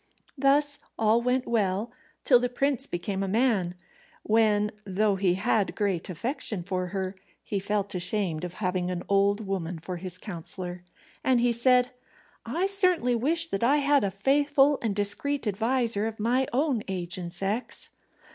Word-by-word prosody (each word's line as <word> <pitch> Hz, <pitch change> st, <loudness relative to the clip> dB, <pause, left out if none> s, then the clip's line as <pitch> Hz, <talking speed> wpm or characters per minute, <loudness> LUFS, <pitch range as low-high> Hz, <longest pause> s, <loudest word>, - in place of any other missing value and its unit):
Thus 285 Hz, +1 st, +2 dB, 0.2 s
all 225 Hz, +1 st, +3 dB
went 250 Hz, +1 st, 0 dB
well 210 Hz, -1 st, 0 dB, 0.3 s
till 250 Hz, -3 st, +6 dB
the 245 Hz, 0 st, -1 dB
prince 275 Hz, +2 st, -1 dB
became 195 Hz, +2 st, -3 dB
a 195 Hz, -, -1 dB
man, 205 Hz, -5 st, +1 dB, 0.5 s
when, 210 Hz, -1 st, +3 dB
though 205 Hz, +1 st, +1 dB
he 185 Hz, -2 st, +2 dB
had 205 Hz, +1 st, 0 dB
great 195 Hz, -5 st, -1 dB
affection 210 Hz, -, -1 dB
for 185 Hz, 0 st, -2 dB
her, 190 Hz, 0 st, -3 dB, 0.3 s
he 200 Hz, -, -2 dB
felt 200 Hz, 0 st, -2 dB
ashamed 180 Hz, -2 st, -1 dB
of 180 Hz, -1 st, -5 dB
having 180 Hz, -2 st, -1 dB
an 180 Hz, -1 st, -3 dB
old 200 Hz, +2 st, +2 dB
woman 180 Hz, -3 st, -3 dB
for 180 Hz, +3 st, -6 dB
his 185 Hz, 0 st, -6 dB
counsellor, 180 Hz, -1 st, -7 dB, 0.4 s
and 255 Hz, -2 st, +3 dB
he 240 Hz, 0 st, +2 dB
said, 250 Hz, +1 st, +3 dB, 0.6 s
"I 355 Hz, +3 st, 0 dB
certainly 365 Hz, -10 st, +2 dB
wish 325 Hz, +8 st, +1 dB
that 195 Hz, -, -1 dB
I 275 Hz, +5 st, +4 dB
had 285 Hz, -2 st, +3 dB
a 200 Hz, -, +1 dB
faithful 280 Hz, +7 st, +2 dB
and 220 Hz, -4 st, -1 dB
discreet 245 Hz, +8 st, 0 dB
adviser 225 Hz, +1 st, +1 dB
of 225 Hz, -1 st, -6 dB
my 250 Hz, +4 st, +1 dB
own 265 Hz, -2 st, +1 dB
age 180 Hz, -1 st, -2 dB
and 170 Hz, -1 st, -5 dB
sex." 195 Hz, +7 st, -2 dB
210 Hz, 160 wpm, -27 LUFS, 190-255 Hz, 0.6 s, till